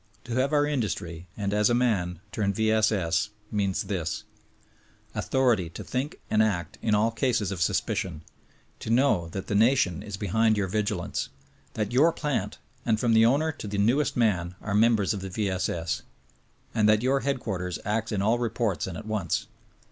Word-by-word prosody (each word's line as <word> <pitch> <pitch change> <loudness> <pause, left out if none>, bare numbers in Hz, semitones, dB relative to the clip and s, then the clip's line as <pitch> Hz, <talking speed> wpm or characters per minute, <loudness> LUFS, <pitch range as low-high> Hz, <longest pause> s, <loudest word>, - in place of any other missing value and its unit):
To 120 - -6
have 130 +3 +1
our 145 -1 +3
industry, 90 - -3
and 100 -1 -1
as 105 +1 +3
a 120 - +3
man, 95 -9 0
turn 100 -2 0
V. 110 +1 +2
S. 110 0 +3
S., 105 +2 0 0.2
means 100 -3 0
this: 90 -5 -3 0.9
Author 130 -2 +2
ity 90 -6 -2
to - - -8
think 130 +4 -3
and 110 - +3
act 100 -3 -1
in 110 -2 +2
all 110 +2 +2
cases 115 -4 0
of 95 -4 -4
suspicion; 85 -1 -1 0.6
to - - -6
know 115 -9 +3
that 95 +3 -5
the - - -3
nation 105 - +3
is 105 -2 -6
behind 110 +3 +2
your 100 -2 0
vigilance; 100 -2 -2 0.5
that 105 -1 -1
your 150 +7 +5
plant, 150 -4 -2 0.3
and 110 -2 +1
from 120 -1 +2
the 110 0 +6
owner 150 +6 +2
to 125 - -8
the 100 0 -3
newest 120 +10 +2
man 90 -7 +1
are 105 - -4
members 110 -1 +3
of 100 - -5
the 95 - -5
V. 100 +1 -1
S. 95 0 -1
S. 80 -5 -2 0.7
And 110 -1 +3
that 110 +1 +4
your 135 +2 +3
headquarters 110 -10 -2
acts 110 +2 -1
in 100 -2 0
all 115 +3 +2
reports 110 -8 -1
and 90 -3 -5
zt 105 - -8
once. 105 -7 -1
105 Hz, 190 wpm, -27 LUFS, 95-115 Hz, 0.9 s, the